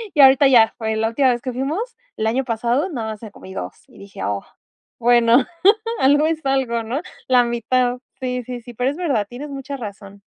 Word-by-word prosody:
Y 295 - +6
ahorita 270 +1 +7
ya 235 -4 +5
fue 220 -1 -1
la 220 +1 0
última 260 +3 +2
vez 240 -1 0
que 255 - -3
fuimos 310 - -3 0.2
el 220 - -1
año 245 +5 +1
pasado, 240 - 0
nada 225 -9 -4
más 215 - -9
me 220 - -8
comí 190 -1 -12
2, - - -6
y - - -18
dije: 200 -1 -9
"Oh", 100 -1 -2 0.6
bueno, 240 +1 +4 0.6
algo 290 +3 +4
es 320 -1 -2
algo, 265 -4 0
¿no?, 235 +6 -3 0.3
la 250 -1 +5
mitad, 245 +1 0 0.2
sí, 250 -1 -2
sí, 245 0 -6
sí. 240 +1 -12
Pero 250 +3 0
es 290 - -6
verdad, 270 - 0
tienes 275 +5 -7
mucha 275 0 -6
razón. 200 -3 -9
245 Hz, 210 wpm, -20 LUFS, 225-270 Hz, 0.6 s, ahorita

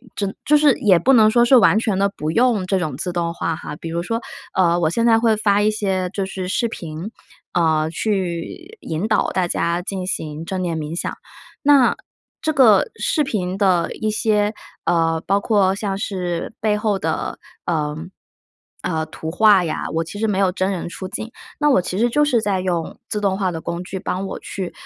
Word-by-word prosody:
真 200 -1 -2
就 300 - +4
是 295 -3 +5
也 190 -5 +5
不 260 +11 +3
能 220 -4 +6
说 235 +2 +4
是 260 - +6
完 220 - +5
全 215 -4 0
的 200 0 +3
不 155 +1 -2
用 230 -3 +2
这 190 0 +1
种 155 -7 -3
自 180 +2 -3
动 170 -1 -1
化 165 -1 -2
哈。 155 - -7
比 165 - -7
如 170 +1 -2
说， 230 +6 -2 0.3
呃， 175 -2 +3
我 160 -2 +2
现 230 +7 0
在 225 -1 +5
会 225 -2 +3
发 205 -1 +2
一 210 - +3
些 190 -4 -1
就 195 -1 -1
是 190 -1 -5
视 235 +5 0
频， 170 +3 -7 0.4
呃， 160 -2 +2
去 195 - -3
引 160 - -3
导 215 - +2
大 180 -2 0
家 170 +1 0
进 185 0 -4
行 155 -2 -4
正 185 +1 -3
念 170 -2 -2
冥 155 +1 -4
想， - - -2 0.5
那 280 -4 +5 0.4
这 315 - 0
个 260 - +5
视 310 - 0
频 190 -6 -2
的 185 -4 +2
一 215 - -2
些， 210 -1 +1 0.3
呃， 165 -1 +2
包 200 +1 +1
括 200 -3 +2
像 195 -1 -3
是 180 -2 -3
背 210 -1 +2
后 210 -2 0
的， 160 -1 -2 0.3
呃， 150 -3 -1 0.9
呃， 160 -2 -1
图 160 0 -7
画 200 -1 +5
呀， 160 - -3
我 165 - 0
其 205 - -8
实 220 - +1
没 205 -3 0
有 190 -2 +3
真 190 +1 0
人 180 -3 -4
出 185 +2 -6
镜， 220 - -5 0.3
那 295 - +2
我 185 - +4
其 180 +1 -4
实 235 +3 +3
就 295 +5 +2
是 255 -5 +2
在 200 -3 0
用 175 -3 -2
自 210 - -1
动 195 -2 +1
化 190 -2 0
的 165 - -5
工 170 +2 -4
具， 190 +1 -6
帮 185 +2 -3
我 - - -6
去， 190 -3 -5
190 Hz, 225 characters per minute, -20 LUFS, 170-215 Hz, 0.9 s, 能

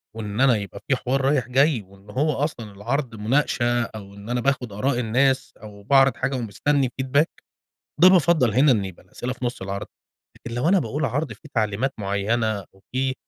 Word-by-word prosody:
وإن 105 +1 -3
أنا 130 -3 +5
يبقى 100 -2 -7
في 135 - +3
حوار 130 +2 -1
رايح 135 -2 +1
جاي، 135 -1 +3
وإن 100 +1 -19
هو 145 +8 +1
أصلًا 115 -8 -4
العرض 120 +5 -3
مُناقشة، 120 +1 +1
أو 105 -3 -9
إن 100 +2 -11
أنا 120 0 0
باخُد 130 -3 0
آراء 125 +5 0
الناس 130 +3 +1
أو 105 -1 -11
باعرض 135 +4 +4
حاجة 135 +1 -1
ومستني 130 +4 0
feedback 140 +4 +3 0.8
ده 180 - +10
بافضّل 170 - +4
هنا 135 +5 +5
إن 105 -5 +1
يبقى 95 -2 -10
الأسئلة 125 +7 -5
في 125 - -6
نُصّ 120 -4 -3
العرض، 100 +1 -4 0.5
لكن 115 - -7
لو 125 +6 0
أنا 195 +1 +5
باقول 145 +2 -2
عرض 140 +5 -2
في - - -16
تعليمات 110 +4 0
معيّنة، 100 +1 -1
وفي 130 +7 -3
120 Hz, 185 wpm, -23 LUFS, 105-135 Hz, 0.8 s, ده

